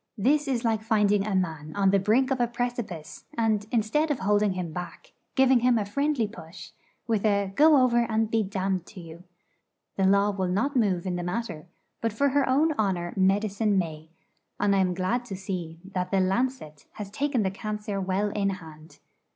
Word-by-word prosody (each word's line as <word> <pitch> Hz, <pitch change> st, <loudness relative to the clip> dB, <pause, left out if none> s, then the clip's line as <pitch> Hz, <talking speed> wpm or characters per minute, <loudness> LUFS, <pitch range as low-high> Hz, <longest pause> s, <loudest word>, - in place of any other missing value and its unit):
This 285 Hz, +8 st, +2 dB
is 250 Hz, -3 st, -1 dB
like 220 Hz, -2 st, +1 dB
finding 210 Hz, -2 st, +2 dB
a 205 Hz, -, -1 dB
man 160 Hz, -4 st, -2 dB
on 195 Hz, -1 st, +3 dB
the 200 Hz, -, +4 dB
brink 235 Hz, +7 st, +2 dB
of 265 Hz, -, 0 dB
a 240 Hz, -, +2 dB
precipice, 235 Hz, -9 st, -5 dB
and, 215 Hz, -2 st, +1 dB
instead 240 Hz, +8 st, +1 dB
of 290 Hz, -, 0 dB
holding 205 Hz, 0 st, +2 dB
him 180 Hz, -3 st, -5 dB
back, 175 Hz, -1 st, -8 dB, 0.2 s
giving 265 Hz, -1 st, +5 dB
him 245 Hz, 0 st, +3 dB
a 210 Hz, -, -1 dB
friendly 280 Hz, +2 st, 0 dB
push, 185 Hz, -6 st, -11 dB, 0.3 s
with 220 Hz, -4 st, 0 dB
a 200 Hz, -2 st, +1 dB
'Go 305 Hz, +5 st, +6 dB
over 245 Hz, -2 st, +3 dB
and 220 Hz, 0 st, 0 dB
be 225 Hz, -, +2 dB
damned 190 Hz, -2 st, -2 dB
to 200 Hz, -, -11 dB
you!' 170 Hz, +1 st, -11 dB, 0.7 s
The 195 Hz, -, +2 dB
Law 200 Hz, +1 st, +4 dB
will 190 Hz, -2 st, -2 dB
not 220 Hz, +11 st, 0 dB
move 195 Hz, -7 st, +1 dB
in 180 Hz, -1 st, -2 dB
the 175 Hz, -, -3 dB
matter; 180 Hz, -3 st, -4 dB, 0.3 s
but 230 Hz, -2 st, -1 dB
for 280 Hz, +6 st, +2 dB
her 275 Hz, -1 st, +1 dB
own 300 Hz, +5 st, +3 dB
honour 180 Hz, -4 st, 0 dB
Medicine 200 Hz, +2 st, +1 dB
may; 160 Hz, -3 st, -3 dB, 0.5 s
and 200 Hz, -1 st, +2 dB
I -, -, +3 dB
am 180 Hz, -1 st, +1 dB
glad 190 Hz, +7 st, -1 dB
to 200 Hz, -, -6 dB
see 180 Hz, -4 st, -5 dB
that 180 Hz, -1 st, -2 dB
the 195 Hz, -, +2 dB
'Lancet' 190 Hz, -, -1 dB
has 205 Hz, -2 st, -7 dB
taken 270 Hz, -1 st, 0 dB
the 190 Hz, -, 0 dB
cancer 210 Hz, 0 st, -4 dB
well 190 Hz, +2 st, 0 dB
in 200 Hz, -1 st, 0 dB
hand. 160 Hz, -4 st, -9 dB
205 Hz, 195 wpm, -26 LUFS, 185-235 Hz, 0.7 s, Go